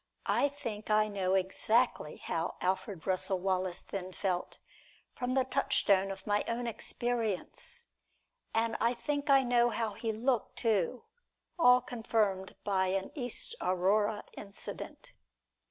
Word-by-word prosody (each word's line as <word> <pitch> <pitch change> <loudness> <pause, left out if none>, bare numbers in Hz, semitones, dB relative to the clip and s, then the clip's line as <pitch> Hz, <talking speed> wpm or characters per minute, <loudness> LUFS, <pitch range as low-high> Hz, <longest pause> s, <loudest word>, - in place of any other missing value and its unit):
I 285 - +2
think 230 -7 -6
I 215 0 +4
know 190 -2 0
exactly 195 0 +1
how 165 +1 -2
Alfred 185 -1 -2
Russel 190 +1 +1
Wallace 185 -1 0
then 185 -2 -5
felt, 180 -2 -2 0.6
from 250 +1 -2
the 265 - +4
touchstone 200 -7 +2
of 195 - -7
my 205 0 +1
own 240 +1 -2
experience; 240 - -1 0.7
and 225 0 +1
I 235 +2 +2
think 285 +3 -2
I 275 -1 +6
know 240 -1 +3
how 225 -2 -1
he 225 +2 -2
looked, 235 +2 -1
too, 220 0 0 0.6
all 250 -4 +7
confirmed 215 -6 -1
by 190 -2 +1
an 190 +1 -1
East 250 - 0
Aurora 200 +4 +1
incident. 200 -1 -5
215 Hz, 130 wpm, -32 LUFS, 190-245 Hz, 0.7 s, all